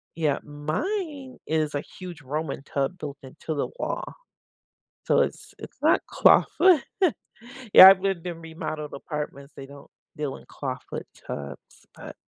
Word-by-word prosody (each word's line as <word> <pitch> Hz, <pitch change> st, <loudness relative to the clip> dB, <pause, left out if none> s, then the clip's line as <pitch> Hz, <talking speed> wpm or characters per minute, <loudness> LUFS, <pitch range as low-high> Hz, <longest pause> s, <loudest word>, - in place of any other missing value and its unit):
yeah. 155 Hz, -4 st, 0 dB
Mine 265 Hz, -, -4 dB
is 155 Hz, -2 st, 0 dB
a 145 Hz, -, -1 dB, 0.2 s
huge 175 Hz, -5 st, -8 dB
Roman 145 Hz, 0 st, -4 dB
tub 140 Hz, +6 st, -2 dB
built 145 Hz, -3 st, -7 dB
into 135 Hz, +4 st, -7 dB
the 145 Hz, -, -1 dB
wall. -, -, -3 dB, 1.0 s
So -, -, +3 dB
it's -, -, -2 dB
it's -, -, -11 dB
not -, -, +4 dB
clawfoot 365 Hz, -6 st, +5 dB, 0.9 s
Yeah, 190 Hz, -, +13 dB
I've 190 Hz, -1 st, +7 dB
lived 190 Hz, -3 st, -2 dB
in 170 Hz, -1 st, -5 dB
remodeled 160 Hz, -2 st, -6 dB
apartments. 140 Hz, -1 st, -6 dB
They 135 Hz, -, -8 dB
don't 140 Hz, 0 st, -14 dB, 0.3 s
deal 150 Hz, -3 st, -3 dB
in -, -, -17 dB
clawfoot 130 Hz, -3 st, -6 dB, 0.2 s
tubs, 70 Hz, 0 st, -8 dB
but -, -, -10 dB
155 Hz, 140 wpm, -25 LUFS, 140-180 Hz, 1.0 s, Yeah